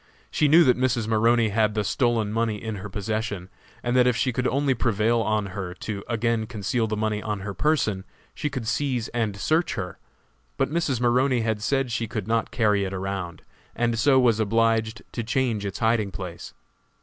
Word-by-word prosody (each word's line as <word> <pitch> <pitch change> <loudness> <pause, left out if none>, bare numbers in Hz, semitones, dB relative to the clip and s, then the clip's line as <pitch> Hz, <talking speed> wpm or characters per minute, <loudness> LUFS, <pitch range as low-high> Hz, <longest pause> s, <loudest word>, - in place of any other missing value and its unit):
She 150 - +2
knew 165 +4 +7
that 125 -3 +3
Mrs. 120 -4 +1
Maroney 115 +1 +3
had 105 0 +1
the 105 - +1
stolen 115 -1 0
money 115 -1 0
in 110 -1 -5
her 100 +2 -7
possession, 105 -2 -3 0.3
and 120 +1 0
that 125 -1 +5
if 125 - +3
she 125 - 0
could 125 +1 0
only 140 0 +1
prevail 115 0 +1
on 105 -3 -1
her 95 -3 -5
to 100 +1 -5
again 115 -1 0
conceal 110 +1 -1
the 110 0 -2
money 105 -1 -1
on 105 -2 -3
her 100 +1 -5
person, 110 -9 +1 0.3
she 150 - -3
could 125 -5 -5
seize 125 -3 -1
and 110 -4 -2
search 160 - +1
her; 90 -2 -5 0.6
but 135 +1 0
Mrs. 155 -7 0
Maroney 125 +1 +2
had 110 -2 -1
said 135 +2 0
she 115 0 -1
could 105 -2 -4
not 115 0 0
carry 105 -4 +2
it 95 0 -3
around, 95 -3 -4 0.3
and 115 -1 0
so 135 +1 +5
was 120 -4 +3
obliged 115 +1 +1
to 120 - -3
change 115 -3 0
its 95 - -5
hiding 110 -3 +1
place. 90 -2 -8
115 Hz, 195 wpm, -25 LUFS, 105-120 Hz, 0.6 s, knew